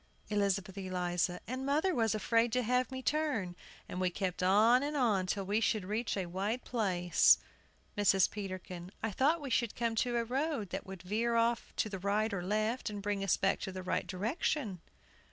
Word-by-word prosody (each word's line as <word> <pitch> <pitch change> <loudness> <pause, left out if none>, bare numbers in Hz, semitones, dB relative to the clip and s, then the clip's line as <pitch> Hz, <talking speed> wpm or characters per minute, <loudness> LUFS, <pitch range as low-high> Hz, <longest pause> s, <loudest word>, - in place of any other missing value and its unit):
ELIZABETH 195 -2 0
ELIZA. 180 -1 -1
And 255 +4 -4
mother 305 +7 +1
was 225 -6 +1
afraid 230 +2 +2
to 250 0 +2
have 250 +1 +1
me 260 0 -5
turn, 275 - 0 0.3
and 180 - -4
we 185 - +2
kept 185 -1 -3
on 215 +7 +5
and 295 +1 -2
on 210 -8 +2
till 195 +1 -1
we 205 +3 +1
should 215 -4 +1
reach 215 +3 -2
a 190 - -1
wide 195 +8 -3
place. 185 -7 +4 0.6
MRS. 200 -2 +4
PETERKIN. 185 -3 -6
I 220 - 0
thought 295 - +2
we 275 -3 -5
should 235 -2 +1
come 230 -1 0
to 240 +1 +1
a 235 - +1
road 260 - -2
that 190 - -4
would 190 -2 -8
veer 225 +5 0
off 230 0 +1
to - - 0
the 195 -3 -5
right 210 +3 0
or 190 - -2
left, 215 +7 -1
and 205 -1 -5
bring 200 0 -2
us 195 - +2
back 195 - +1
to 190 - -4
the 185 0 -6
right 185 - -1
direction. 205 - -2
210 Hz, 195 wpm, -33 LUFS, 185-240 Hz, 0.6 s, on